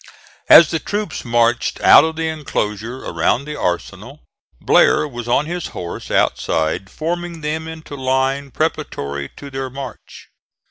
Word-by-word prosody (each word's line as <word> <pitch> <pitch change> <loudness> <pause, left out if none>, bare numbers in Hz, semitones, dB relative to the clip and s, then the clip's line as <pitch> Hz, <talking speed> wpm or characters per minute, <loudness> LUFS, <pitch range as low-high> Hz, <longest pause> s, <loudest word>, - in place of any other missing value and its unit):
As 165 - +9
the 165 - 0
troops 205 +6 -4
marched 120 0 +1
out - - +8
of 160 0 -2
the 160 0 -2
enclosure 125 -6 -4
around 85 +11 0
the 150 0 -6
arsenal, 100 - -4 0.4
Blair 150 - +4
was 120 -4 -7
on 130 +5 +2
his 175 +2 -4
horse 85 -1 -6
outside 80 +4 0
forming 170 +1 -4
them 155 +1 -3
into 160 -2 -9
line 135 +1 0
preparatory 70 - -3
to 140 -1 -10
their 135 0 -4
march. 135 0 -10
135 Hz, 140 wpm, -19 LUFS, 120-160 Hz, 0.4 s, As